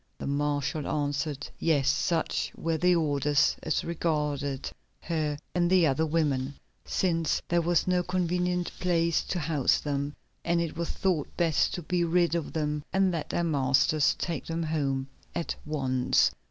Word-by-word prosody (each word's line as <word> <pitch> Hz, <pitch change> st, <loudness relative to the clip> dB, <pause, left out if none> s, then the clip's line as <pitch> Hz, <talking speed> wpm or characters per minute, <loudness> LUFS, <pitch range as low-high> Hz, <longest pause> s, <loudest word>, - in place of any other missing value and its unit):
The -, -, -6 dB
marshal 145 Hz, +1 st, -1 dB
answered 145 Hz, -1 st, -2 dB
yes, 145 Hz, -5 st, +2 dB
such 165 Hz, -2 st, 0 dB
were 165 Hz, -1 st, -1 dB
the 180 Hz, +2 st, +4 dB
orders 145 Hz, -2 st, +2 dB
as 155 Hz, -, 0 dB
regarded 150 Hz, -5 st, -2 dB, 0.3 s
her 155 Hz, -3 st, -1 dB, 0.2 s
and 175 Hz, -1 st, +2 dB
the 185 Hz, -2 st, +5 dB
other 155 Hz, +2 st, +1 dB
women, 145 Hz, -4 st, 0 dB, 0.3 s
since 165 Hz, -4 st, 0 dB
there 175 Hz, 0 st, +2 dB
was 170 Hz, 0 st, +2 dB
no 180 Hz, -1 st, +2 dB
convenient 180 Hz, 0 st, 0 dB
place 170 Hz, -2 st, +2 dB
to 180 Hz, -, -2 dB
house 155 Hz, -5 st, +2 dB
them, 145 Hz, 0 st, -2 dB, 0.3 s
and 170 Hz, 0 st, +1 dB
it 170 Hz, -1 st, -2 dB
was 170 Hz, 0 st, -3 dB
thought 180 Hz, -7 st, 0 dB
best 165 Hz, -3 st, +2 dB
to 175 Hz, -, -5 dB
be 175 Hz, +2 st, 0 dB
rid 170 Hz, 0 st, +2 dB
of 170 Hz, -3 st, -2 dB
them 150 Hz, -1 st, -1 dB
and 190 Hz, 0 st, +3 dB
let 165 Hz, -3 st, -3 dB
their 175 Hz, -, 0 dB
masters 145 Hz, -1 st, +3 dB
take 170 Hz, -5 st, -3 dB
them 165 Hz, 0 st, -2 dB
home 140 Hz, -4 st, -1 dB, 0.3 s
at 170 Hz, -, -2 dB
once. 130 Hz, -4 st, +2 dB
160 Hz, 155 wpm, -28 LUFS, 145-170 Hz, 0.3 s, the